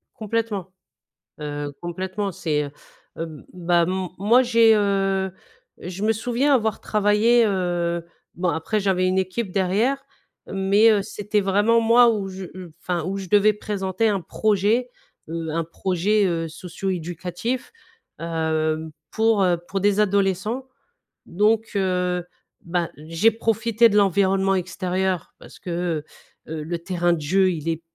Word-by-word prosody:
Complètement. 215 -4 -3 0.7
Heu, 145 -1 -4
complètement 190 +3 -3
c'est, 150 -3 -1
heu, 145 - -7 0.5
hem, 160 -2 -7
bah, 175 -1 +2
m 185 0 -2
moi 225 +6 +5
j'ai 230 -2 +5
heu, 195 -2 +1 0.5
je 180 +3 -7
me 220 +1 +3
souviens 245 +6 +1
avoir 220 -4 0
travaillé, 215 +3 +3
heu, 175 -3 -1 0.3
bon 180 +1 -1
après 170 +7 -1
j'avais 190 -2 +1
une 185 +1 +1
équipe 190 +2 -2
derrière. 210 +9 +1 0.4
Mais, 195 +3 +4
heu, 210 -2 +3
c'était 210 +1 -2
vraiment 205 +4 +3
moi 235 +1 +6
où 205 -4 -2
je 190 0 -7
j - - -14 0.3
enfin 175 -3 -2
où 190 +3 -3
je 195 -1 -6
devais 210 +2 +5
présenter 205 0 -1
un 200 -2 0
projet. 215 +7 +1 0.4
Heu, 165 0 -4
un 165 +1 0
projet, 190 +5 0
heu, 165 -2 -1
socio-éducatif. 180 +6 -4 0.5
Hem, 160 -1 -1 0.2
pour, 220 -2 +2
heu, 180 -1 +3
pour 195 - -2
des 205 +1 +2
adolescents 200 +5 0 0.6
donc, 215 +4 +1
heu, 180 -2 0 0.4
bah, 170 -1 -2
j'ai 165 +8 +2
profité 225 +1 +2
de 210 - +1
l'environnement 195 0 +3
extérieur 185 0 -2
parce - - -14
que, 170 -3 -2 0.5
heu, - - -4
heu, 155 -1 -4
le 170 +2 -4
terrain 175 0 0
de 165 - -3
jeu 185 +5 +3
il 160 -2 -5
est 165 0 -2
190 Hz, 145 wpm, -23 LUFS, 175-210 Hz, 0.7 s, moi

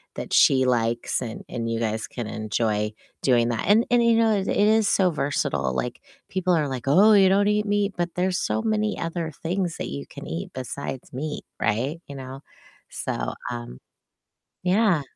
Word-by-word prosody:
that - - -5
she 130 -1 +5
likes 120 -1 0
and 115 -3 -6
and 115 -1 -4
you 115 0 -1
guys 110 -1 -2
can 120 - -5
enjoy 105 0 -1 0.3
doing 120 -3 +3
that. 115 -2 -2
And 220 +4 +5
and 240 -1 +5
you 235 -1 +4
know, 225 -1 +4
it 195 -1 -1
it - - 0
is 220 -1 +4
so 185 -2 +3
versatile. 70 - -1
Like, 60 - -3 0.3
people 185 -2 +1
are 150 -2 +1
like, 130 -1 -5
"Oh, 195 +10 +6
you 195 -2 +6
don't 200 +2 +3
eat 210 0 +1
meat?" 205 -1 +1
But 175 -1 -3
there's 185 +1 0
so 220 - -1
many 215 -1 0
other 165 -1 -3
things 175 0 -1
that - - -4
you 70 0 -6
can - - -10
eat 80 +2 -5
besides 130 +1 -6
meat, 150 +4 -4
right? 130 +10 -1
You 140 - -8
know, 130 0 -8 0.5
so, - - -3 0.2
um, 120 - -6 0.9
yeah. 190 -2 +3
150 Hz, 185 wpm, -24 LUFS, 115-195 Hz, 0.9 s, Oh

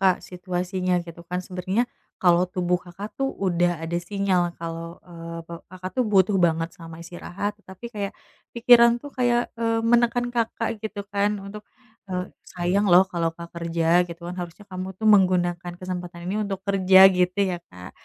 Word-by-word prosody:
Kak, 190 -2 +5
situasinya. 180 0 -2
Gitu 170 0 -11
kan 180 0 -1
sebenarnya 185 +4 -1 0.4
kalau 175 -1 +5
tubuh 180 -1 +1
Kakak 195 +4 -8
tuh, 270 0 +1 0.2
udah 175 -1 +2
ada 165 +1 -2
sinyal 195 -3 +1 0.2
kalau, 165 +1 -6
e - - -15 0.4
pe 170 - -10 0.2
Kakak 185 0 -6
tuh, 255 - +2
butuh 195 +1 +4
banget 165 0 +1
sama 165 -3 -10
istirahat. 180 +4 -5 0.2
Tapi 190 +4 -12
kayak 200 -1 -3 0.4
pikiran 235 0 +7
tuh, 290 - -8
kayak, 240 -1 +3 0.2
e - - -1 0.3
menekan 240 +1 +3
Kakak, 230 -1 -1 0.2
gitu 210 -1 -4
kan, 200 +1 +2
untuk, 205 +2 -9 0.5
e - - -6 0.4
"Sayang 180 +3 +1
loh, 180 +2 +9
kalau 170 -1 0
enggak 170 0 -10
kerja, 165 -1 -2 0.2
gitu 170 0 -9
kan. 180 - -5
Harusnya 175 +4 -8
kamu 185 0 -5
tuh, 220 -1 +2
menggunakan 180 -3 +3
kesempatan 180 -1 -6
ini 195 - -1
untuk 195 -2 -4
kerja," 190 -1 +5 0.2
gitu 180 +1 +1
ya, 175 - -2 0.2
Kak. 90 0 -10
185 Hz, 170 wpm, -24 LUFS, 175-205 Hz, 0.5 s, loh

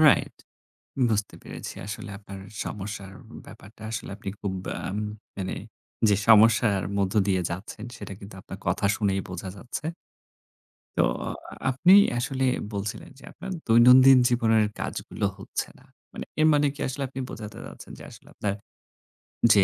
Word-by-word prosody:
Right. 155 -2 +5 0.7
বুঝতে 105 -2 -1
পেরেছি - - -7
আসলে 105 0 -6
আপনার 100 -1 -10 0.2
সমস্যার 100 -1 -6 0.3
ব্যাপারটা। 110 +2 -14
আসলে 115 - -4
আপনি 100 - -5
খুব 100 -2 -2
ব্যাম 95 - -4 0.4
মানে 95 -1 -3 0.5
যে 100 - +4
সমস্যার 110 -2 +6 0.2
মধ্য 95 +1 0
দিয়ে 95 -2 +2
যাচ্ছেন 95 +5 -6
সেটা 105 -4 -8
কিন্তু 100 0 -10
আপনার 95 - -9
কথা 100 - +1
শুনেই 100 -2 +1
বোঝা 95 +1 -5
যাচ্ছে। 125 +7 -6 1.1
তো - - +4 0.7
আপনি 170 +9 +4 0.3
আসলে 130 +2 -1 0.3
বলছিলেন 100 +1 -4
যে - - -16
আপনার 190 +4 -8 0.2
দৈনন্দিন 125 +3 +8
জীবনের 115 -3 +3
কাজগুলো 100 - -3
হচ্ছে 95 - -4
না। - - -20 0.3
মানে - - -6 0.2
এর 155 - +6
মানে 145 0 +4
কি 145 - -11
আসলে 130 +2 -4
আপনি 135 +1 -6
বোঝাতে 105 -1 -8
চাচ্ছেন - - -11
যে - - -10
আসলে - - -15
আপনার 100 -1 -1 1.0
যে 100 - +6
105 Hz, 145 wpm, -26 LUFS, 100-125 Hz, 1.1 s, দৈনন্দিন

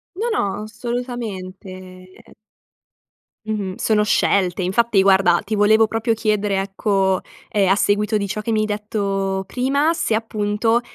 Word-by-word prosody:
No, 455 +5 -2
no 205 - -1
assolutamente. 195 -6 -7 1.1
Mh-mh, 205 -4 -3
sono 210 -1 +1
scelte. 190 -3 +1
Infatti 195 +3 +2
guarda 190 -3 +4
ti 215 - -3
volevo 215 +2 +4
proprio 225 +1 -1
chiedere 210 -3 0
ecco, 195 -1 0 0.3
ehm, 200 -3 +2
a 195 - +5
seguito 210 +1 +1
di 200 -1 -1
ciò 210 +2 -4
che 215 - -4
mi 215 - +2
hai - - +1
detto 200 -2 -2
prima, 280 +5 +1
se 335 - -1
appunto, 220 +1 0
210 Hz, 135 wpm, -20 LUFS, 195-225 Hz, 1.1 s, a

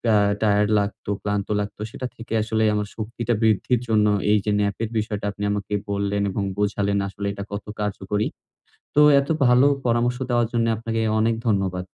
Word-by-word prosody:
আ - - +6 0.2
tired 105 -1 +3
লাগতো, 100 0 -4
ক্লান্ত 105 -1 -2
লাগতো 105 0 -5
সেটা 130 - -5
থেকে 115 -1 -8
আসলে 110 0 0
আমার 105 -1 -1
শক্তিটা 115 +2 -3
বৃদ্ধির 110 +2 +2
জন্য, 105 -2 +3 0.2
এই 105 - +5
যে 105 - +1
ন্যাপের 105 +2 -1
বিষয়টা 105 -1 -2
আপনি 100 0 -7
আমাকে 105 0 -3 0.2
বললেন 100 0 -1
এবং 100 - -2
বোঝালেন 100 0 0
আসলে 100 +1 -5
এটা 100 - -6
কত 100 0 -5
কার্যকরী। 105 0 -1 0.7
তো 150 - +6 0.2
এত 140 - -7 0.2
ভালো 125 +3 +5 0.2
পরামর্শ 120 +1 +1
দেওয়ার 120 -1 +2
জন্য 115 -1 +2
আপনাকে 115 0 -2 0.2
অনেক 115 +1 +2
ধন্যবাদ। 95 -4 0
105 Hz, 170 wpm, -23 LUFS, 100-115 Hz, 0.7 s, আ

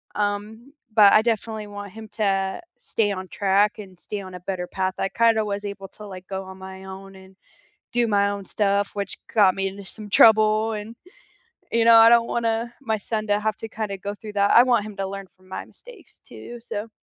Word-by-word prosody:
Um, 210 +5 -3 0.2
but 210 -2 +7
I 215 - +7
definitely 220 -1 -2
want 205 -1 -8
him 220 0 -10
to 195 - 0 0.2
stay 220 -3 0
on 185 -1 -5
track 200 +2 +1
and 190 -3 -11
stay 210 - -5
on 185 -1 -10
a - - -7
better 180 -1 -4
path. 190 0 -2
I - - +1
kind 230 +1 +3
of 215 - +1
was 205 0 -3
able 200 -1 -6
to, 210 - -12
like, 185 -2 -10
go 190 -1 -4
on 190 0 -11
my 190 0 -10
own 195 0 -10
and 190 0 -16 0.6
do 240 -1 +2
my 200 -1 +3
own 200 -1 -5
stuff, 200 +1 0
which 200 -1 -4
got 200 -4 +5
me 195 0 -1
into 195 +1 -9
some 205 +2 -8
trouble, 215 0 +5
and, 215 +2 -6 0.8
you 230 0 +3
know, 230 - +8
I 225 0 +9
don't 235 0 +5
wanna 230 0 -1
my 220 -4 -1
son 215 +1 -3
to 205 0 +2
have 215 0 -1
to 225 - -7
kind 215 -1 -4
of 195 -1 -5
go 205 0 -4
through 210 0 -10
that. 200 0 +2
I 235 - +9
want 240 -4 +2
him 210 -1 -9
to 195 -1 -2
learn 195 0 -7
from 185 0 -24
my 190 - -6
mistakes - - -14
too, 240 0 -10
so 225 -1 -5
205 Hz, 225 wpm, -23 LUFS, 195-220 Hz, 0.8 s, I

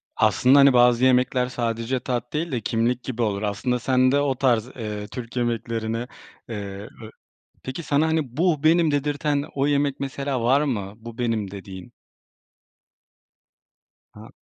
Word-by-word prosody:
Aslında, 135 +3 +4
hani, 140 -1 +7
bazı 120 0 +5
yemekler 125 0 +3
sadece 120 +1 -2
tat 120 -1 -4
değil 160 +2 -2
de 120 -4 -2
kimlik 115 +3 0
gibi 120 -2 -4
olur. 100 -2 0
Aslında 115 +4 -1
sen 130 +1 +2
de 140 - +3
o 140 -2 +1
tarz, 120 -3 +1
eee, 105 -3 -5
Türk 120 +1 -8
yemeklerini, 115 -1 -2 0.4
eee, 100 -2 -6
be 110 - -9 0.5
Peki, 130 +6 -5
sana, 150 +1 +1
hani, 155 -6 -1
bu 165 -3 +1
benim 165 0 +4
dedirten 145 0 0
o 140 0 +1
yemek 140 -1 0
mesela 140 -2 -3
var 130 +4 +4
mı 105 -9 -2
bu 115 +1 -11
benim 115 -5 -1
dediğin? 95 -2 -10 2.2
A - - -12
125 Hz, 150 wpm, -23 LUFS, 115-140 Hz, 2.2 s, hani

